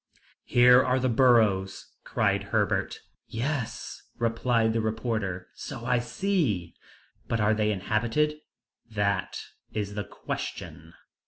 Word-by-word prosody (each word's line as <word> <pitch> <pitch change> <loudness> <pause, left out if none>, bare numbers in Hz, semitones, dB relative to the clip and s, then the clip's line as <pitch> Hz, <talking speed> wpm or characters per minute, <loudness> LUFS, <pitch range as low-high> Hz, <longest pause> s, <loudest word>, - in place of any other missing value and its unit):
"Here 125 +1 +6
are 130 +1 +1
the 130 0 +1
burrows!" 110 -6 +3
cried - - 0
Herbert. - - 0 0.3
"Yes," 125 +1 -4 0.2
replied 115 -1 +1
the 115 - +1
reporter, 110 -5 -2
"so 120 -4 -7
I 125 0 +2
see." 120 - -1 0.5
"But 115 - -1
are 105 0 +3
they 105 0 +1
inhabited?" 115 +9 0 0.5
"That 100 -3 -1 0.3
is 105 -1 -3
the 105 0 -3
question." 80 -4 -7
115 Hz, 110 wpm, -27 LUFS, 105-125 Hz, 0.5 s, Here